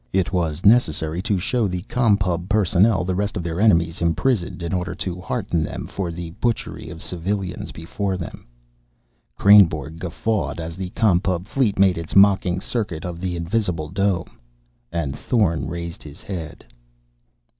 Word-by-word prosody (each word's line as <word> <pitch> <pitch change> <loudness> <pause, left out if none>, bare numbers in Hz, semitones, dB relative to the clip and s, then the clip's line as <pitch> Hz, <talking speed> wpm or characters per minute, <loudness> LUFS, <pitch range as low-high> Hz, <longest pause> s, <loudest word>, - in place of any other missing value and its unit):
It 95 0 0
was 85 -2 -1
necessary 85 -7 +3
to 100 +1 0
show 110 +4 0
the 90 -1 -4
Com 115 -2 +2
Pub 90 -2 -2
personnel 100 0 +3
the 90 +1 -1
rest 100 +3 -1
of 90 - -3
their 85 +2 -2
enemies 85 -6 +3
imprisoned, 85 +2 0
in 85 - -3
order 90 0 -2
to 90 +1 -4
hearten 95 -4 -1
them - - -5
for 90 -3 -4
the 85 0 -6
butchery 120 -8 -2
of 80 +1 -9
civilians 95 +2 -3
before 95 +4 -3
them. 85 -7 -8 0.9
Kreynborg 80 -7 +5
guffawed 95 +3 -2
as 80 0 -5
the 95 0 -5
Com 105 -6 +4
Pub 90 -1 -2
fleet 110 -2 0
made 95 -3 +4
its 85 - -6
mocking 95 -2 +5
circuit 100 -9 -3
of 85 -1 -5
the 90 -2 -2
invisible 85 -3 -1
dome. 95 0 -1 0.5
And 80 -5 -2
Thorn 100 -10 +1
raised 85 -1 -6
his 75 -1 -12
head. 85 -6 -7
90 Hz, 160 wpm, -22 LUFS, 85-100 Hz, 0.9 s, Kreynborg